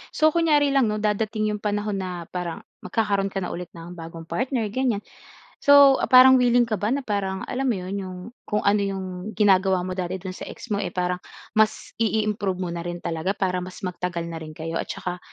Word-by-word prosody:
So 310 0 +4
kunyari 300 -4 +3
lang 270 -4 +3
'no, 210 0 -1
dadating 215 0 0
'yong 210 -1 -4
panahon 205 -1 -1
na 180 -2 -4
parang 175 -2 -4 0.2
magkakaroon 200 -3 0
ka 195 - -2
na 180 - -3
ulit 175 0 -6
ng 170 +1 -9
bagong 165 0 -8
partner, 235 +3 -1
ganyan. 235 -2 0 0.6
So, 285 -1 +7
parang 260 0 +8
willing 245 -1 +4
ka 215 -3 -2
ba 210 +3 0
na 280 - -2
parang, 195 -4 -2
alam 270 +2 -1
mo 245 - +2
'yon, 185 +2 -5
yung, 185 -2 -6 0.3
kung 210 0 0
ano 200 +1 +3
yung 195 -1 -3 0.3
ginagawa 190 -2 +3
mo 185 - -3
dati 185 0 -3
do'n 185 -1 -5
sa - - -8
ex 245 - -10
mo, 205 - +1
eh, 200 - -2
parang 180 0 0 0.4
mas 215 -1 +1
i-i-improve 210 -4 0
mo 180 - -2
na 170 0 -4
rin 175 0 -4
talaga 165 +4 -2
para 185 -2 0
mas 185 +1 -8
magtagal 180 -2 -3
na 165 -1 -5
rin 155 -1 -9
kayo? 165 +1 -4
At - - -3
tsaka, 180 0 -4
200 Hz, 210 wpm, -24 LUFS, 180-220 Hz, 0.6 s, parang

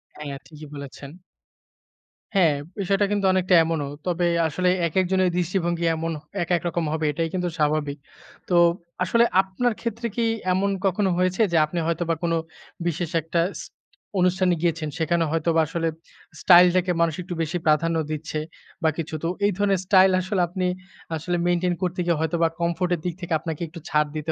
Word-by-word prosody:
হ্যাঁ, 145 -2 -6
ঠিকই 155 -1 -12
বলেছেন। 140 -1 -8 1.3
হ্যাঁ। 170 -6 +4 0.2
বিষয়টা 195 +1 +2
কিন্তু 205 -1 0
অনেকটা 185 0 +3
এমনও। 160 -3 -2 0.2
তবে 175 0 +1 0.2
আসলে 180 +4 0 0.2
একেক 185 +3 +1
জনের 185 -1 +3
দৃষ্টিভঙ্গি 175 -1 0
এমন 165 +1 -3 0.3
একেকরকম 170 0 -1
হবে 160 -1 -1
এটাই 165 +2 -2
কিন্তু 180 -1 -1
স্বাভাবিক। 150 -1 0 0.5
তো, 180 - +2 0.5
আসলে 230 +6 +3 0.2
আপনার 195 +6 -1
ক্ষেত্রে 230 0 -3
কি 235 - +1 0.3
এমন 195 +2 +1 0.2
কখনো 195 +1 +2
হয়েছে, 185 +3 +1
যে 170 - +3
আপনি 170 +3 -4
হয়তোবা 165 0 0
কোন 170 -1 +1 0.5
বিশেষ 170 0 -2
একটা 165 +2 0
ইস - - -7 0.6
অনুষ্ঠানে 180 0 +3
গিয়েছেন। 165 -2 0
সেখানে 165 +1 +1
হয়তোবা 165 0 +2
আসলে 165 +1 -2 0.5
স্টাইলটাকে 180 0 +6
মানুষ 165 -2 +2
একটু 180 0 -6
বেশি 160 +2 -1
প্রাধান্য 165 +2 +2 0.2
দিচ্ছে 155 0 -3 0.4
বা 160 - +4
কিছু। 160 -1 -4
তো, - - 0 0.2
এই 205 - +3
ধরনের 200 -2 +2
স্টাইল 190 0 +6
আসলে 185 +1 -1
আপনি 185 +2 -3 0.5
আসলে 175 +3 -2
মেইনটেইন 175 0 +1
করতে 180 0 -2
গিয়ে 170 -2 +1
হয়তোবা 165 +1 +1
comfort 170 +1 0
এর - - -8
দিক 175 - -1
থেকে 175 -1 -3
আপনাকে 160 0 -5
একটু 170 +2 -10
ছাড় 150 0 +2
দিতে 155 +1 -2
170 Hz, 165 wpm, -24 LUFS, 160-185 Hz, 1.3 s, স্টাইলটাকে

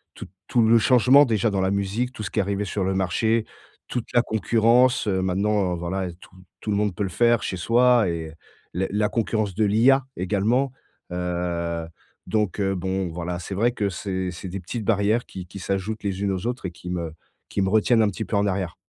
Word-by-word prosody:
tout - - -8 0.2
tout 120 - +2
le 115 +1 +6
changement 125 +4 +6
déjà 110 -2 +1
dans 100 -1 0
la 95 +1 +1
musique, 100 +5 -1
tout 110 - -7
ce 95 - -5
qui - - -1
est - - +5
arrivé 100 +1 -2
sur 100 +1 -2
le 95 +1 0
marché, 110 +5 +1 0.4
toute 125 -2 -3
la 120 - +5
concurrence, 115 +3 +3
heu, 95 -2 +1
maintenant, 95 0 +1
heu, - - -6
voilà, 90 +1 -3
tout 95 - -17 0.3
tout 105 - -3
le - - +1
monde 105 -3 0
peut 100 - -2
le 95 - -2
faire 120 -1 +4
chez 95 - -2
soi 120 +1 +4
et, 80 -2 -4 0.4
le 95 +2 -1
la 105 +1 +1
concurrence 110 -4 -1
de 110 - +1
l'IA, 120 +7 +4
également, 110 +9 +1 0.4
heu, 85 -2 -2 0.4
donc, 105 -3 0
heu, 95 -1 +1
bon, 95 +1 -2
voilà, 85 +1 -4
c'est 95 +2 -6
vrai 115 +5 +2
que 105 -4 -1
c'est 95 0 -3
c'est 90 +1 -8
des 95 - -5
petites 105 +6 -5
barrières 110 +2 +2
qui 95 -1 -8
qui 100 - -9
s'ajoutent 100 +3 -3
les 100 -1 -2
unes 100 -1 0
aux 95 +2 -4
autres 125 -3 -4
et - - -7
qui 90 +1 -10
me 85 -3 -3 0.4
qui 100 - -1
me 95 - +1
retiennent 110 +3 +3
un 105 - +3
petit 110 +3 -5
peu 105 - -3
en 100 - +2
arrière. 95 -3 -2
100 Hz, 220 wpm, -24 LUFS, 95-110 Hz, 0.4 s, le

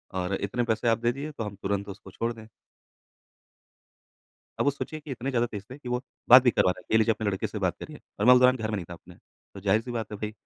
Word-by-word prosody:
और 90 +1 -2
इतने 100 +6 -2
पैसे 115 0 -1
आप 115 - +4
दे 120 0 +1
दिए, 145 +4 -6
तो 115 - -5
हम 105 -1 -6
तुरंत 100 +1 -3
उसको 95 0 -10
छोड़ 115 +5 -2
दें। 110 -1 -13 2.1
अब - - +1
वो 145 - +4
सोचिए 155 +2 -6
कि 150 -1 -11
इतने 130 +1 -3
ज़्यादा 120 -2 +1
तेज़ 105 -4 -7
थे 130 - -9
कि 130 - -9
वो 125 +1 -1 0.3
बात 125 +1 +10
भी 125 - +4
करवाना 90 -5 +1
है, - - -21
ये 110 - +6
लीजिए 110 0 +3
अपने 110 - -5
लड़के 95 - -2
से - - -6
बात - - 0
करिए - - -9 0.2
और 105 - +1
मैं 125 - +9
उस 125 - +5
दौरान 125 0 +5
घर 110 -2 -3
में 110 - -1
नहीं 95 - -4
था - - -6
अपने। 90 0 -15 0.4
तो 100 - -8
जाहिर 100 +3 +2
सी 125 - -8
बात 115 -3 -4
है - - -4
भई 105 0 -4
115 Hz, 275 wpm, -27 LUFS, 100-125 Hz, 2.1 s, बात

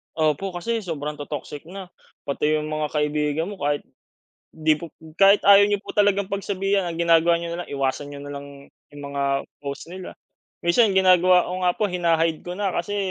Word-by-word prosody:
Opo 160 +4 0
kasi 225 +7 -2
sobrang 150 -6 -5
to-toxic 145 +1 -7
na 185 0 -9 0.3
pati 150 +2 0
yung 155 0 -3
mga 155 0 -1
kaibigan 150 +3 -1
mo 200 - -9
kahit 145 -1 -1 0.7
di 155 -1 0
po 170 - -7 0.3
kahit 200 +1 +6
ayaw 200 0 +7
niyo 205 - +2
po 200 - -9
talagang 205 -1 +2
pagsabihan 195 -1 -1
ang 165 - -5
ginagawa 170 0 +4
niyo 170 0 -5
nalang 175 +1 -5
iwasan 140 +1 -2
niyo 145 0 -8
nalang 140 -1 -10 0.2
yung 145 0 -12
mga 140 -1 0 0.2
post 140 +4 -7
nila, 185 0 -9 0.5
minsan 195 +3 +3
ginagawa 185 -1 +5
ko - - -5
nga 180 -1 +2
po - - -3
hina-hide 165 -2 +1
ko 180 0 -7
na 200 -2 -1
kasi 190 +4 -3
170 Hz, 180 wpm, -23 LUFS, 150-190 Hz, 0.7 s, ayaw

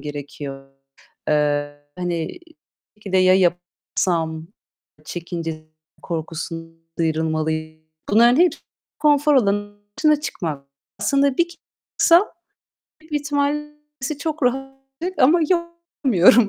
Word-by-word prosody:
gerekiyor. 140 -1 -7 0.6
Eee, 145 -1 +1 0.2
hani, 175 - -3 0.6
belki 205 -2 -9
de, 190 - +5
"Ya, 185 0 +6
yapamazsam" 175 -2 0 0.6
çekince 165 -2 -5 0.4
korkusun 165 0 -6
sıyrılmalıyım. 155 -1 -1 0.3
Bunların 235 +4 +6
hep 355 0 +5 0.5
konfor 295 -1 +4
alanın 205 -3 0 0.2
dışına 305 -2 +4
çıkmak. 155 - -4 0.3
Aslında 280 -1 +2
bir 340 0 +3 0.5
çıksam 345 +4 +6 0.7
büyük 315 0 -18
ihtimal 290 0 0 0.4
işte 280 +2 -3
çok 310 -1 -3
rahat 260 +2 +2 0.5
ama 315 +7 +5
yok 340 -1 +2 0.4
yapamıyorum. 210 -1 +6
185 Hz, 100 wpm, -22 LUFS, -, 0.7 s, Ya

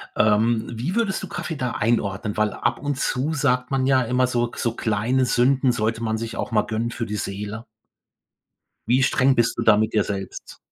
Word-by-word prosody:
Ähm, 110 +2 +2
wie 130 - -3
würdest 225 -5 0
du - - -6
Kaffee 165 -1 -5
da 125 -4 -2
einordnen? 105 -2 -1
Weil 110 -1 +1
ab 120 0 -1
und 145 -2 -3
zu 135 +5 -1
sagt 125 -4 +1
man 135 -1 +1
ja 135 -1 +4
immer 125 +2 +1
so 120 -1 -1
so 115 -1 -2
kleine 115 +4 0
Sünden 130 +2 +3
sollte 115 -1 -1
man 110 -1 -1
sich 115 +1 -5
auch - - -4
mal 110 -2 +3
gönnen 115 +1 -2
für 115 - -4
die 105 -1 -4
Seele. 105 +3 -5 1.2
Wie 125 +3 +3
streng 135 0 +3
bist 120 -1 +2
du - - 0
da - - +5
mit 110 +1 0
dir 105 - +4
selbst? 100 -2 -6
120 Hz, 200 wpm, -23 LUFS, 110-130 Hz, 1.2 s, da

